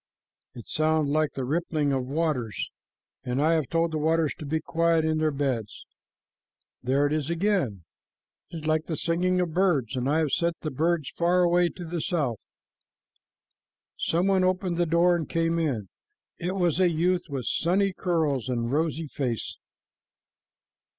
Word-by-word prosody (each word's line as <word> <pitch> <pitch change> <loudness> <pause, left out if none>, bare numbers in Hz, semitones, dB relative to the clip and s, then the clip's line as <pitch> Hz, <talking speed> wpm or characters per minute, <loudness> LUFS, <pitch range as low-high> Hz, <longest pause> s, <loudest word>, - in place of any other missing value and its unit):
It 120 - -10
sounds 155 -1 +1
like 155 0 +1
the 130 - -3
rippling 155 -1 0
of 130 -1 -1
waters, 140 -7 -2 0.5
and 125 +2 -2
I 155 +3 +3
have 155 -5 +1
told 165 0 +1
the 155 - -2
waters 160 0 +1
to 150 - -6
be 160 +2 0
quiet 165 0 +1
in 155 0 +1
their 155 0 +2
beds. 135 -7 -3 1.0
There 135 +3 +2
it 145 - 0
is 155 -1 -1
again. 170 - 0 0.7
It 165 - -7
is 155 - -4
like 155 0 +1
the 160 - -3
singing 180 +2 +1
of 175 -3 -1
birds, 155 - +1
and 130 +1 -1
I 150 - +2
have 155 -3 +1
sent 170 -1 0
the 155 - -3
birds 160 +1 0
far 175 +1 +2
away 175 0 +3
to 175 - -9
the 170 0 -3
south." 140 - -2 1.5
Some 170 +3 0
one 195 -1 +3
opened 185 -1 0
the 175 -1 +1
door 170 +2 +4
and 160 -4 -3
came 165 0 +1
in. 130 -11 -1 0.5
It 180 +2 -2
was 175 -3 +1
a 185 -1 +5
youth 175 +2 +1
with 135 -4 -4
sunny 190 +4 +1
curls 155 - 0
and 120 -1 -1
rosy 160 +2 0
face. 130 -6 -3
160 Hz, 170 wpm, -26 LUFS, 140-170 Hz, 1.5 s, a